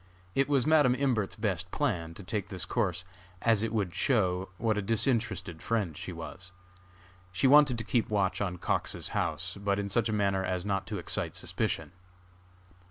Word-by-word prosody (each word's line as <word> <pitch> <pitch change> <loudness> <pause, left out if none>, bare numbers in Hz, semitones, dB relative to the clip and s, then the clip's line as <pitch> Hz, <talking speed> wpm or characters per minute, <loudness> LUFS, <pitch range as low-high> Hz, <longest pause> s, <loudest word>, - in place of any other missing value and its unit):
It 135 +1 +2
was 135 -3 +3
Madam 150 -5 +5
Imbert's 125 -7 0
best 95 -5 -2
plan 85 -2 -1
to 100 - -9
take 105 0 -3
this 95 -4 -3
course, 90 -1 -1 0.4
as 115 -3 +4
it 115 -1 -1
would 100 -6 -1
show 95 -8 +1
what 115 0 +1
a 105 - 0
disinterested 115 -5 0
friend 105 -9 -1
she 90 - -6
was. 90 +2 -7 0.8
She 95 - 0
wanted 140 -2 +6
to 110 - -3
keep 115 +1 0
watch 100 -3 +1
on 90 -3 -2
Cox's - - -1
house, 85 +3 -2
but 100 -1 +1
in 100 0 -2
such 115 +3 +2
a - - 0
manner 100 -2 +1
as 90 0 -2
not 100 -1 -1
to 105 - -3
excite 85 - -2
suspicion. - - -2
100 Hz, 175 wpm, -30 LUFS, 90-115 Hz, 0.8 s, wanted